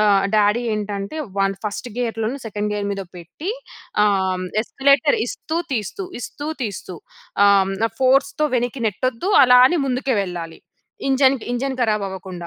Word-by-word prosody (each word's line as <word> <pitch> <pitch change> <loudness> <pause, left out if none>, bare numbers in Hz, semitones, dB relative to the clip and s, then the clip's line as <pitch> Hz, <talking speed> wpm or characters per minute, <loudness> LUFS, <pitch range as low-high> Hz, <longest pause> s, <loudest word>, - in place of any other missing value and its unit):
ఆహ్, 200 -2 +4
డాడీ 210 +3 +3
ఏంటంటే, 205 +4 -4 0.2
one 195 0 +2
first 210 +4 -4
గెయర్‌లో‌నో 230 +2 -2
second 210 0 -3
gear 205 -1 -2
మీదో 195 -1 -4
పెట్టి, 175 - -6 0.5
ఆహ్, 205 -1 +3 0.2
హ్మ్, 185 - -4 0.2
ఎస్కలేటర్ 280 +5 +3
ఇస్తూ 315 +6 -4 0.2
తీస్తూ, 235 - -4
ఇస్తూ 290 +5 -6
తీస్తూ 195 -5 -5 0.5
ఆహ్, 200 -1 +6
హ్మ్, 195 - -3 0.2
ఫోర్స్‌తో 275 +3 +3
వెనక్కి 245 +1 -2
నెట్టొద్దు. 255 - -1
అలా 250 -1 +7
అని 345 +5 +1
ముందుకు 260 0 0
వెళ్ళాలి. 170 -3 -6 0.5
ఇంజన్, 265 0 +4
ఇంజన్ 260 +1 -2
కరాబ్ 215 -3 +1
అవ్వకుండా. 185 -2 -8
220 Hz, 145 wpm, -21 LUFS, 200-265 Hz, 0.5 s, అలా